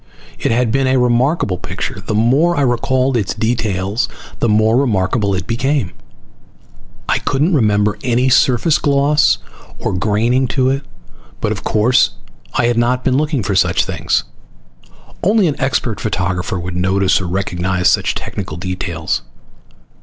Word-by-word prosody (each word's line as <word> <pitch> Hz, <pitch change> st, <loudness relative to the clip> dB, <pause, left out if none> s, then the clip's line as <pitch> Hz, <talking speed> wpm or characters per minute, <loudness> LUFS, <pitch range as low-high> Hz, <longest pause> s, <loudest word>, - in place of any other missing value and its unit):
It -, -, 0 dB
had 120 Hz, 0 st, +1 dB
been 135 Hz, +1 st, +1 dB
a 130 Hz, 0 st, +2 dB
remarkable 125 Hz, -, +1 dB
picture. -, -, -5 dB
The 110 Hz, -, -2 dB
more 140 Hz, +10 st, +2 dB
I -, -, +2 dB
recalled 130 Hz, +1 st, +1 dB
its 105 Hz, -5 st, -1 dB
details 105 Hz, -2 st, -1 dB, 0.3 s
the 120 Hz, -, +1 dB
more 110 Hz, +1 st, +3 dB
remarkable 105 Hz, -4 st, +1 dB
it 90 Hz, -1 st, -3 dB
became. 125 Hz, -, -1 dB, 1.2 s
I -, -, +1 dB
couldn't 150 Hz, +7 st, 0 dB
remember 105 Hz, -6 st, +2 dB
any 125 Hz, 0 st, +1 dB
surface 130 Hz, +4 st, +3 dB
gloss 145 Hz, +1 st, +3 dB, 0.4 s
or -, -, -3 dB
graining 110 Hz, +7 st, +1 dB
to 130 Hz, 0 st, +3 dB
it, 135 Hz, +1 st, -1 dB, 0.6 s
but -, -, -1 dB
of -, -, -4 dB
course 110 Hz, -, +2 dB, 0.4 s
I -, -, +2 dB
had 120 Hz, -1 st, +2 dB
not 125 Hz, +2 st, +1 dB
been 130 Hz, -, +1 dB
looking 150 Hz, -5 st, 0 dB
for 100 Hz, -, -1 dB
such 95 Hz, -, +2 dB
things. -, -, -1 dB, 1.0 s
Only 205 Hz, +2 st, +3 dB
an 150 Hz, -, -2 dB
expert 125 Hz, -5 st, -1 dB
photographer 95 Hz, -1 st, -2 dB
would 90 Hz, 0 st, -5 dB
notice 95 Hz, +1 st, +1 dB
or 90 Hz, -, -4 dB
recognize 90 Hz, 0 st, -1 dB
such -, -, 0 dB
technical 80 Hz, -, -5 dB
details. 90 Hz, -3 st, -3 dB
115 Hz, 145 wpm, -17 LUFS, 95-130 Hz, 1.2 s, more